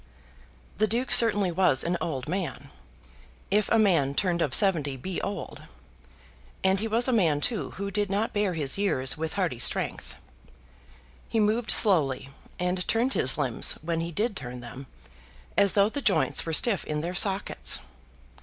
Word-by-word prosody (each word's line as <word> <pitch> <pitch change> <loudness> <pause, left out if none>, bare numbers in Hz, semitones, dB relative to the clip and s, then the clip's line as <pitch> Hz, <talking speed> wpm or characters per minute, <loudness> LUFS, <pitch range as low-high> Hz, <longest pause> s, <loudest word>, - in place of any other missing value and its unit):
The 215 - +3
Duke 240 +5 -1
certainly 205 -5 +5
was 165 -7 +1
an 175 +1 -1
old 135 -5 -4
man, 170 - -5 0.8
if 210 +1 +1
a 230 - +3
man 165 -10 +2
turned 175 -1 0
of 140 -5 +2
seventy 155 -9 +2
be 180 +8 -5
old; 200 - -6 1.0
and 190 0 +2
he 220 - -2
was 230 +3 +1
a 255 - +1
man 165 -10 +2
too 220 +6 -1
who 200 +1 -4
did 205 0 -2
not 210 +4 -1
bear 205 -4 -1
his 145 +2 -2
years 135 -10 0
with 160 0 -5
hearty 175 -11 -2
strength. - - -1 1.1
He 225 - 0
moved 215 +2 0
slowly, 145 - +4 0.3
and 180 0 -2
turned 240 +4 0
his 130 - +2
limbs, 130 -6 +1
when 165 0 -2
he 165 +1 -4
did 210 +5 -2
turn 125 -6 -7
them, 125 +3 -10 0.7
as 200 -1 +3
though 200 0 +3
the 285 +6 -5
joints 190 -7 +1
were - - -2
stiff 205 +4 +2
in 150 0 -4
their 170 +3 -4
sockets. 195 +1 +2
185 Hz, 165 wpm, -26 LUFS, 150-210 Hz, 1.1 s, certainly